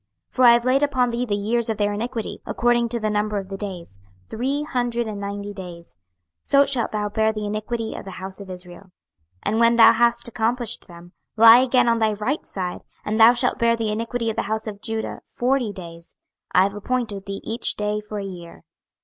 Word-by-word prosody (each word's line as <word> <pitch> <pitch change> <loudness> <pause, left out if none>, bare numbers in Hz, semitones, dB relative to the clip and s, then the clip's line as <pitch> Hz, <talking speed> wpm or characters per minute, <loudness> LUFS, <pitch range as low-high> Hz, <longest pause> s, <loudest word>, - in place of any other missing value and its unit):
26:004:005 - - -35
For 255 - +2
I 240 - +9
have 235 0 +2
laid 260 +2 +3
upon 255 -4 +1
thee 240 +1 -1
the 205 - 0
years 225 +3 -1
of 220 - -1
their 205 0 0
iniquity, 230 +1 -4
according 240 -1 +1
to 235 0 -3
the 215 -1 -1
number 210 0 0
of 195 -1 -5
the 195 - -5
days, 180 - -8 0.3
three 270 +6 -1
hundred 245 -4 -1
and 215 -2 -5
ninety 200 0 -5
days: 175 -4 -10 0.5
so 280 0 +4
shalt 260 -5 0
thou 210 -1 -1
bear 220 +1 +1
the 215 -1 -5
iniquity 220 +2 -3
of - - -7
the - - -7
house 190 +1 -7
of 195 - -10
Israel. 180 +1 -8
26:004:006 - - -25 0.5
And 220 +2 0
when 235 0 +5
thou 225 -1 +8
hast 235 +1 +2
accomplished 235 0 -2
them, 175 0 -13 0.3
lie 230 +2 +9
again 255 -1 +3
on 230 -1 +3
thy 220 -1 +2
right 215 +9 -3
side, 180 -2 -4 0.2
and 215 +2 -1
thou 225 +2 +8
shalt 240 - 0
bear 235 0 +3
the 225 -2 -2
iniquity 230 +1 -2
of - - -8
the - - 0
house 220 0 -2
of 205 -2 -7
Judah 225 -1 -4
forty 250 -2 0
days: 170 -3 -11 0.4
I 185 - +5
have 200 +1 -1
appointed 205 -2 -3
thee 195 0 -5
each 230 +2 -2
day 210 0 -2
for 210 0 -7
a 200 - -4
year. 175 -3 -10
220 Hz, 220 wpm, -22 LUFS, 200-235 Hz, 0.5 s, I